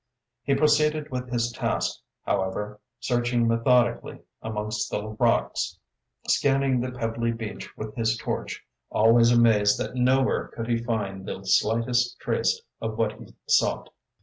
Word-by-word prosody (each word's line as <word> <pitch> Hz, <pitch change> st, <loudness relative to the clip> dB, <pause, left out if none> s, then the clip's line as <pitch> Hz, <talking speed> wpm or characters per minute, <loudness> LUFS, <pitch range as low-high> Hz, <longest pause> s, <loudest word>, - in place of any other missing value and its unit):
He 140 Hz, -, +1 dB
proceeded 150 Hz, 0 st, +2 dB
with 125 Hz, -1 st, -4 dB
his 120 Hz, -1 st, 0 dB
task, -, -, -2 dB, 0.3 s
however, 105 Hz, +2 st, -2 dB, 0.2 s
searching 120 Hz, -1 st, +1 dB
methodically 120 Hz, +1 st, +2 dB, 0.2 s
amongst 105 Hz, -1 st, -3 dB
the 105 Hz, +1 st, -3 dB
rocks, 110 Hz, -, 0 dB, 0.5 s
scanning 135 Hz, -2 st, +2 dB
the 125 Hz, +1 st, -3 dB
pebbly 115 Hz, -1 st, -2 dB
beach 110 Hz, -2 st, -7 dB
with 110 Hz, 0 st, -6 dB
his 115 Hz, -1 st, 0 dB
torch, -, -, -4 dB, 0.2 s
always 115 Hz, +2 st, +5 dB
amazed 110 Hz, -4 st, +4 dB
that -, -, -3 dB
nowhere 130 Hz, +1 st, +2 dB
could 115 Hz, -1 st, -6 dB
he 115 Hz, -1 st, 0 dB
find 100 Hz, -5 st, -3 dB
the 95 Hz, -, -5 dB
slightest 115 Hz, +5 st, +1 dB
trace 465 Hz, 0 st, 0 dB, 0.2 s
of -, -, -4 dB
what -, -, +1 dB
he -, -, -13 dB
sought. -, -, +2 dB
115 Hz, 135 wpm, -25 LUFS, 110-125 Hz, 0.5 s, always